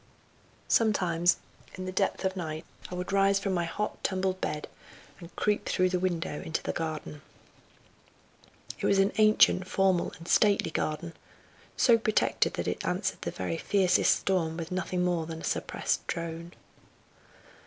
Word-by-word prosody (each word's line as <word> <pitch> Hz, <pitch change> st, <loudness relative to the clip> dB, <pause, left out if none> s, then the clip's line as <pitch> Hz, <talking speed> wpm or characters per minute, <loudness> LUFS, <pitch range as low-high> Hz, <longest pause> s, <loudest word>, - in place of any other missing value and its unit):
Sometimes 180 Hz, -6 st, +3 dB, 0.4 s
in 185 Hz, -, -6 dB
the 185 Hz, -, -3 dB
depth 195 Hz, +1 st, 0 dB
of 190 Hz, 0 st, 0 dB
night 160 Hz, -2 st, -5 dB, 0.2 s
I 180 Hz, -, -5 dB
would 180 Hz, +1 st, -4 dB
rise 195 Hz, 0 st, +4 dB
from 195 Hz, -1 st, -1 dB
my 175 Hz, -1 st, 0 dB
hot, 210 Hz, +5 st, -4 dB
tumbled 185 Hz, -1 st, -1 dB
bed 150 Hz, -, -3 dB, 0.5 s
and 170 Hz, -1 st, -12 dB
creep 210 Hz, -1 st, 0 dB
through 185 Hz, -1 st, +2 dB
the 180 Hz, 0 st, 0 dB
window 170 Hz, -4 st, -2 dB
into 160 Hz, -, -3 dB
the -, -, -2 dB
garden. 155 Hz, -2 st, -5 dB, 1.6 s
It -, -, 0 dB
was 200 Hz, -, +3 dB
an 195 Hz, +2 st, +3 dB
ancient, 215 Hz, -3 st, +5 dB
formal 190 Hz, -2 st, +2 dB
and 165 Hz, -, -12 dB
stately 205 Hz, -5 st, +3 dB
garden, 160 Hz, +2 st, -2 dB, 0.6 s
so 235 Hz, -2 st, +5 dB
protected 215 Hz, -1 st, +1 dB
that -, -, -3 dB
it -, -, -2 dB
answered -, -, -2 dB
the -, -, -3 dB
very 90 Hz, -3 st, -3 dB
fiercest 190 Hz, -3 st, +3 dB
storm 165 Hz, -4 st, 0 dB
with 165 Hz, 0 st, -6 dB
nothing 180 Hz, 0 st, -1 dB
more 175 Hz, -3 st, 0 dB
than 160 Hz, -1 st, -6 dB
a -, -, -11 dB
suppressed -, -, -2 dB
drone. 170 Hz, +1 st, -5 dB
180 Hz, 155 wpm, -29 LUFS, 165-195 Hz, 1.6 s, ancient